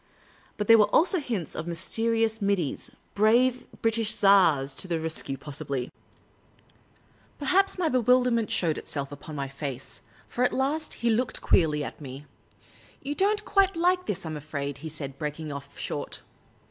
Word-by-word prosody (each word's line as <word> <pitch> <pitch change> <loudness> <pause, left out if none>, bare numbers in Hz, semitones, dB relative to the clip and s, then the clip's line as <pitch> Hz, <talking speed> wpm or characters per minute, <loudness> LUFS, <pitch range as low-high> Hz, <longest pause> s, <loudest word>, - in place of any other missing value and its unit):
But 210 - -1
there 225 +1 +7
were 210 - +7
also 365 +3 +4
hints 225 - -3
of 160 - -5
mysterious 225 +6 0
middies 195 -7 -1
— - - -38
brave 240 +5 +3 0.2
British 225 -1 +2
tars 165 -9 +4
to - - -2
the 170 -2 -1
re.s 160 0 -1
cue, 135 - -5
possibly! 140 -2 -4 1.5
Perhaps 380 +9 +2
my 355 -3 +1
bewilderment 250 -3 +3
showed 165 -3 0
itself 140 -1 -5
upon 155 +2 -9
my 140 -1 -3
face, 135 -1 -7 0.3
for 245 - -1
at 250 - +2
last 290 +4 -1
he 235 - +4
looked 225 +1 -1
queerly 150 -4 +3
at - - -8
me. 135 +1 -8 0.4
" - - -26
You 285 - -2
don't 415 +5 +1
quite 390 -2 +3
like 360 +2 +1
this, 190 -3 -3
I - - -4
'm 155 - -4
afraid," 140 -2 -5
he 160 +2 -6
said, 140 -3 -7
breaking 150 0 -4
off 140 0 -9
short. - - -5
195 Hz, 170 wpm, -27 LUFS, -, 1.5 s, there